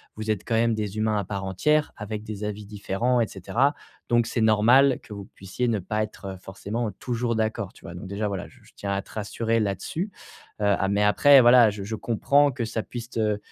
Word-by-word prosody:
vous 110 0 -2
êtes 105 -2 -2
quand 115 - +1
même 115 0 +3
des 105 -1 -3
humains 110 -1 +1
à 100 - -2
part 100 0 -4
entière, 150 +11 +1
avec 105 0 -5
des 105 -1 -6
avis 105 0 -5
différents 105 +4 -1
et 115 - +2
cetera. 130 - 0 0.3
Donc 120 -1 +3
c'est 120 +1 -3
normal 120 +5 +5
que 105 - -10
vous 100 -1 -7
puissiez 95 +6 -3
ne 110 -3 +1
pas 105 +4 -2
être, 105 -1 -9
heu, - - -11
forcément, 100 +5 -4
heu, 100 - -6
toujours 120 -1 -1
d'accord, 110 -2 -2
tu - - -19
vois? 85 - -8
Donc 90 +2 -8
déjà 100 +2 -2
voilà, 95 -3 -4
j - - -20
je - - -20
tiens 100 -1 -4
à 100 - -1
te - - -18
rassurer 115 +2 -1
là-dessus, 110 - -2 0.5
heu, 105 - +1
a 100 -1 +2
mais 100 +1 +1
après, 135 +6 +7
voilà, 120 -1 +7
je 100 -1 -7
je 110 +3 -4
comprends 140 +7 +2
que 120 -2 -3
ça 110 0 -3
puisse 120 -1 -7
te 105 -3 0
110 Hz, 235 wpm, -25 LUFS, 100-120 Hz, 0.5 s, après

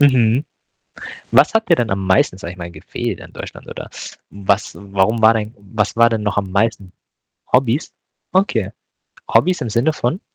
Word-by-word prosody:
Mhm. 130 -2 +4 0.9
Was - - +5
hat 225 0 +2
ihr 170 - +7
denn 120 -7 -1
am 95 0 -1
meisten, 95 0 +3
sage 90 - -7
ich - - -16
mal, 85 0 -7
gefehlt - - -5
an - - -13
Deutschland - - -9
oder - - -8 0.4
was 100 +1 -1
warum 100 +3 0
war 110 +1 +7
dein 110 0 -3
was 100 +1 -2
war 115 0 +5
denn 110 -2 -1
noch 105 0 -1
am 100 -2 -1
meisten 100 -2 0 0.6
Hobbys? 125 +2 +2 0.4
Okay. 120 - +1 0.6
Hobbys 180 +1 +3
im 115 - -3
Sinne 120 +9 +2
von? 150 +5 -2
110 Hz, 175 wpm, -19 LUFS, 100-125 Hz, 0.9 s, ihr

